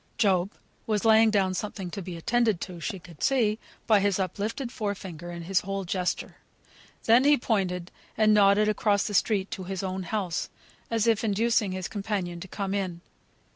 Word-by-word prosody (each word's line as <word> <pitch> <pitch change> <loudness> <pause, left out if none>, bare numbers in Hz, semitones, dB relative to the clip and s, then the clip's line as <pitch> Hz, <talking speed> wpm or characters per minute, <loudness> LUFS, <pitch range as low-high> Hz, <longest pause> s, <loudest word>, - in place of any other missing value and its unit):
Job 195 -3 +2 0.4
was 215 -1 0
laying 220 0 +6
down 195 -3 +2
something 190 -2 -4
to 200 - -5
be 180 -2 -7
attended 225 +2 +1
to 180 -2 -7
she 195 +5 -4
could 170 -4 -15
see, 225 -5 +2 0.3
by 215 -2 +5
his 200 -1 +1
up 190 0 -3
lifted 230 +4 -3
fore 205 -4 -2
finger, 175 -3 -8
and 170 -1 -7
his 190 0 +2
whole 195 0 -4
gesture; 180 0 -2 0.7
then 235 +3 +5
he 290 +1 +5
pointed 185 -6 -1 0.3
and 215 -1 +5
nodded 205 0 +5
across 210 -1 +2
the 210 - -3
street 200 -1 +1
to 185 - -5
his 190 0 -4
own 190 0 -3
house, 185 -2 -2 0.4
as 225 -1 +1
if 225 -1 +2
inducing 220 -1 +1
his 185 -1 -3
companion 195 -4 -3
to 190 - -8
come 195 +1 -3
in. 185 -4 -3
200 Hz, 185 wpm, -27 LUFS, 185-215 Hz, 0.7 s, laying